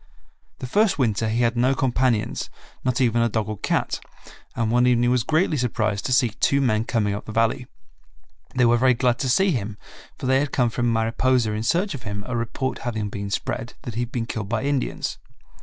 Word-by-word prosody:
The - - -6
first 205 - +2
winter 110 -4 +1
he 115 +2 +1
had 120 +1 +2
no 130 +3 +2
companions, 125 -4 0 0.3
not 130 -1 0
even 120 -2 +2
a 115 - +2
dog 110 -1 -1
or 110 - -5
cat, - - -1 0.6
and 115 -1 0
one 125 +1 +4
evening 120 0 +3
was 125 -1 +3
greatly 155 +5 +1
surprised 110 -5 -1
to - - -3
see 125 -1 +4
two 140 +5 +1
men 115 -5 +1
coming 105 -5 0
up 100 - -5
the - - -7
Valley. 115 +3 +1 0.9
They 125 -1 +4
were 120 0 +4
very 130 +1 +4
glad 125 0 +1
to 130 - -1
see 190 +9 +3
him, 110 -6 -3 0.4
for - - -6
they 130 +1 +3
had 145 0 -1
come 120 -4 +1
from 120 +1 0
Mariposa 115 +1 +1
in 105 +1 -2
search 175 - +1
of 135 - -6
him, 100 -3 -5
a 125 - -3
report 120 +3 -2
having 110 -5 -3
been 100 0 -5
spread 115 +3 -3
that 120 - -6
he 115 - -2
had 120 0 -4
been 120 -3 -2
killed 110 -3 -5
by 115 +2 -1
Indians. 140 -1 -2
120 Hz, 215 wpm, -23 LUFS, 110-130 Hz, 0.9 s, one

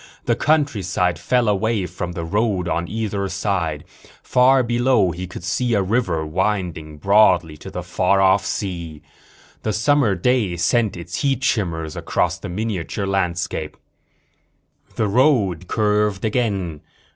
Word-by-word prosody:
The - - +2
countryside 95 - +1
fell 125 +5 +1
away 105 0 +1
from 90 0 -5
the 85 - -4
road 100 0 0
on 85 0 -1
either 105 -2 -2
side. 85 -9 -2 0.4
Far 130 +1 +4
below 120 -5 +2
he 90 +3 -6
could 90 - -9
see 115 +6 0
a 100 - +2
river, 95 -6 0
winding 85 -3 -2
broadly 90 -3 +3
to - - -9
the - - -5
far 100 - +1
off 95 +1 +4
sea. 85 -6 -4 0.6
The 110 - -1
summer 115 0 +2
day 105 -2 +1
sent 105 +3 +1
its 85 +2 -5
heat 135 -2 0
shimmers 85 - -1
across 90 +2 -1
the 100 - -7
miniature 100 0 -3
landscape. 90 -5 -2 1.2
The 110 - +1
road 100 - +2
curved 105 -1 +1
again. 100 -9 -1
95 Hz, 135 wpm, -21 LUFS, 85-110 Hz, 1.2 s, Far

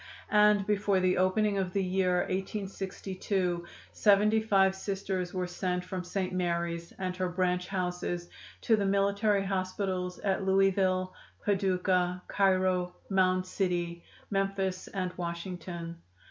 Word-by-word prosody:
And 210 -1 +5
before 205 -2 +2
the 185 0 +2
opening 200 +2 +2
of 185 -1 -2
the 195 - +1
year 180 -1 +2
1862 190 -2 -3 0.3
seventy 210 +1 +4
five 195 -3 +4
Sisters 190 -2 -3
were 185 -1 -2
sent 180 0 -2
from 185 0 -4
St. 185 +1 -3
Mary's, 170 -1 -1
and 185 -1 -3
her 185 -1 0
branch 180 0 0
houses, 180 -2 -2 0.3
to 225 - +4
the 205 -2 0
military 200 +1 +2
hospitals 185 -1 -2
at 195 -1 0
Louisville, 190 -1 +2 0.3
Paducah, 185 -2 +1
Cairo, 185 -2 +2 0.2
Mound 185 -1 +3
City, 175 -2 -2 0.3
Memphis 195 -1 -1
and 185 -2 -3
Washington. 170 -1 -5
185 Hz, 120 wpm, -30 LUFS, 180-195 Hz, 0.3 s, And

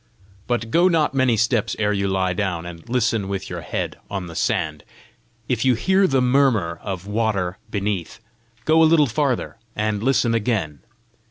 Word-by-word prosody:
But 120 -2 -1
go 175 +2 +5
not 160 -5 +2
many 130 -4 +2
steps 115 0 +1
ere 105 -1 +1
you 100 -1 0
lie 95 -1 0
down, 90 -4 -2
and 85 +1 -10
listen 115 -4 +1
with 95 -1 -4
your - - -4
head - - -4
on 100 -2 -4
the 85 - -9
sand. 75 -2 -1 0.6
If 120 -3 0
you 130 -2 +4
hear 190 - +3
the 135 -4 +2
murmur 125 -10 +2
of 95 -2 -5
water 100 -4 -1
beneath, 100 -2 -3 0.5
go 160 +1 +4
a 160 - +6
little 160 -2 +5
farther, 130 -2 -1 0.2
and 105 -1 -1
listen 125 -1 +2
again. 105 - -1
110 Hz, 170 wpm, -22 LUFS, 95-130 Hz, 0.6 s, a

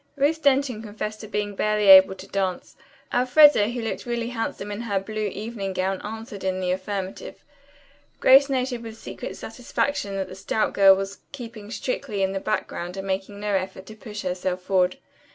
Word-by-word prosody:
Ruth 300 +3 +1
Denton 270 -5 +2
confessed 215 0 -6
to 215 - -8
being 205 0 -2
barely 210 +1 +1
able 190 0 +9
to 185 - -11
dance. 190 -2 -3 0.4
Elfreda, 250 -2 +6
who 240 -1 -4
looked 225 - -4
really 235 -1 -2
handsome 225 -3 -4
in 205 +2 -4
her 205 -4 -1
blue 215 +2 -3
evening 205 -1 -5
gown, 190 +1 -1
answered 220 -1 -7
in 185 0 -1
the 180 -1 0
affirmative. 190 - -5 0.8
Grace 275 +2 +7
noted 255 -2 -1
with 225 -1 -9
secret - - -7
satisfaction 230 -2 -2
that 195 -1 -2
the - - -10
stout 190 +3 -1
girl 195 -1 +7
was 195 +1 -5
keeping 230 -6 -9
strictly 230 -4 -3
in 190 - +1
the 195 - -2
background 180 -1 -3
and 195 - -5
making 195 +1 -3
no 210 0 -2
effort 190 0 -2
to 215 - -11
push 210 -2 -8
herself 180 0 -2
forward. 185 -1 +2
210 Hz, 180 wpm, -24 LUFS, 190-235 Hz, 0.8 s, able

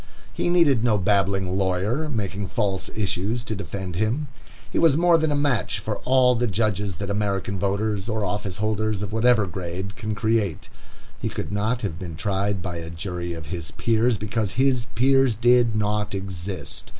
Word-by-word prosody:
He - - 0
needed 155 -10 +4
no 115 -3 +3
babbling 95 -1 +1
lawyer, 100 +10 0
making 100 -5 -3
false 95 -1 -1
issues, 105 +3 -1
to 110 - -4
defend 95 -1 -5
him. 120 +8 0 0.4
He - - -2
was 160 -4 +5
more 175 0 +5
than 160 -1 +1
a - - +1
match 145 -5 +1
for - - -3
all 130 -1 +4
the 120 0 0
judges 105 -2 0
that 100 +3 -4
American 100 -1 -1
voters, 100 +1 -1
or 110 -2 0
office 100 -1 -3
holders 110 -1 -1
of 105 +1 -5
whatever 115 -1 +4
grade, 95 +2 -5
can 110 -3 -3
create. 105 - 0 0.5
He - - -2
could - - -5
not 110 +4 -1
have 85 -5 -3
been 90 -4 -6
tried 100 +1 -1
by 90 -3 -4
a 80 -1 -6
jury 85 +1 -4
of 80 -2 -7
his 85 -2 -4
peers, 115 +3 +1
because 105 0 -2
his 130 -2 +2
peers 135 0 +4
did 120 0 +4
not 105 -1 0
exist. 95 -3 -5
105 Hz, 175 wpm, -24 LUFS, 95-115 Hz, 0.5 s, was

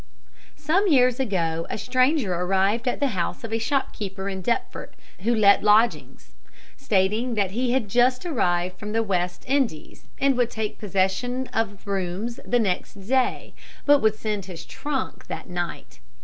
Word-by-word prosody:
Some 320 +7 +1
years 255 -5 +4
ago, 165 -9 -1
a - - -3
stranger 255 - +1
arrived 195 +6 +1
at 245 - 0
the 280 - +2
house 185 -1 -3
of 225 -1 -5
a 225 - +1
shopkeeper 205 -6 -2
in 190 -1 -5
Deptford 235 +5 -3 0.2
who 235 +5 +1
let 200 -2 +5
lodgings, 165 - +2 0.4
stating 215 +6 0
that 200 -3 0
he 245 +3 0
had 260 -5 +1
just 250 - +2
arrived 180 - 0
from 210 0 -5
the 225 0 +2
West 180 -3 -2
Indies, 260 - -1
and 275 -1 +3
would 245 -2 +2
take 220 -2 -4
possession 205 +6 0
of 205 -3 -2
rooms 195 +4 -3
the 245 - +1
next 200 -5 -1
day, 250 +6 -1 0.3
but 290 -1 +6
would 220 -3 +2
send 210 -3 -3
his 180 -3 -9
trunk 290 -3 -4
that - - -6
night. 175 - -5
215 Hz, 160 wpm, -24 LUFS, 190-250 Hz, 0.4 s, but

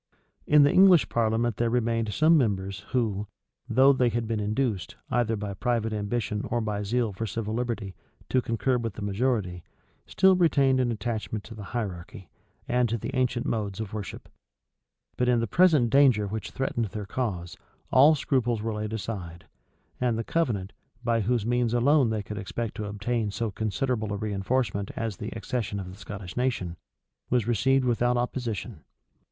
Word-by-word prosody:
In 150 0 +7
the 145 - +5
English 185 -4 +6
parliament 115 0 +1
there 120 0 +1
remained 115 -2 0
some 155 +10 +4
members 100 - 0
who, 105 -5 -1 0.4
though 130 +4 +6
they 125 -2 +2
had 115 -1 -2
been 110 -1 -1
induced, 105 -4 -1 0.2
either 120 -2 +1
by 100 -1 -4
private 115 0 -1
ambition 105 0 -2
or 120 - 0
by 105 -2 -2
zeal 115 +1 0
for 110 +4 -4
civil 110 +1 -3
liberty, 115 -5 -3 0.4
to 130 - +2
concur 120 +2 0
with 115 -3 -3
the 105 - -6
majority, 100 -4 -1 0.4
still 190 0 +4
retained 140 -7 +3
an 125 -2 +1
attachment 110 -1 -3
to 115 - -10
the 105 -2 -8
hierarchy, 95 -2 -6 0.4
and 125 -1 +2
to 115 - 0
the - - -5
ancient 125 -2 0
modes 105 -3 -2
of 110 -3 -5
worship. 105 -2 -6 0.9
But 125 0 +2
in 120 -1 +3
the 115 - 0
present 150 - +4
danger 130 -6 +5
which 105 0 -4
threatened 125 -3 -1
their 105 +1 -6
cause, 95 -7 -3 0.4
all 145 +5 +7
scruples 125 -5 0
were 110 +1 -2
laid 105 0 -4
aside; 95 -6 -5 0.5
and 120 -3 +1
the 115 - -2
covenant, 110 - -1 0.3
by 115 -1 +1
whose 115 0 0
means 120 0 +1
alone 135 +1 +4
they 110 -2 -2
could 105 +1 -6
expect 105 +3 -4
to 105 - -3
obtain 105 +2 -2
so 110 +2 -3
considerable 110 +1 -2
a - - -2
reënforcement 100 0 -1
as 110 -5 -3
the 105 - -5
accession 110 -4 -3
of 90 -1 -6
the - - -11
Scottish 100 -3 -8
nation, 120 -9 -1 0.5
was 120 -4 +2
received 130 +4 +2
without 120 0 +2
opposition. 120 -4 -3
115 Hz, 170 wpm, -27 LUFS, 105-125 Hz, 0.9 s, In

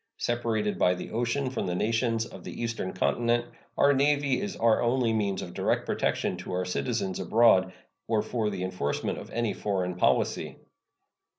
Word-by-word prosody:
Separated 115 -3 -1
by 90 - +4
the 90 - -7
ocean 120 +4 -1
from 130 - -2
the 90 - -1
nations 115 +2 +1
of - - -11
the - - -8
Eastern 115 -5 -2
Continent, 120 +5 +1 0.3
our 140 0 +5
Navy 140 0 +2
is 205 -1 -4
our 115 -1 +3
only 120 -1 +2
means 100 -3 0
of 85 - -8
direct - - 0
protection - - -1
to - - -7
our 90 0 -1
citizens 95 0 -2
abroad 95 -1 +4 0.4
or 110 -2 +1
for 110 -1 -1
the 95 -3 -4
enforcement 90 -6 -2
of - - -10
any 115 -2 -1
foreign 95 -3 -1
policy. 90 - +1
110 Hz, 170 wpm, -28 LUFS, 95-120 Hz, 0.4 s, our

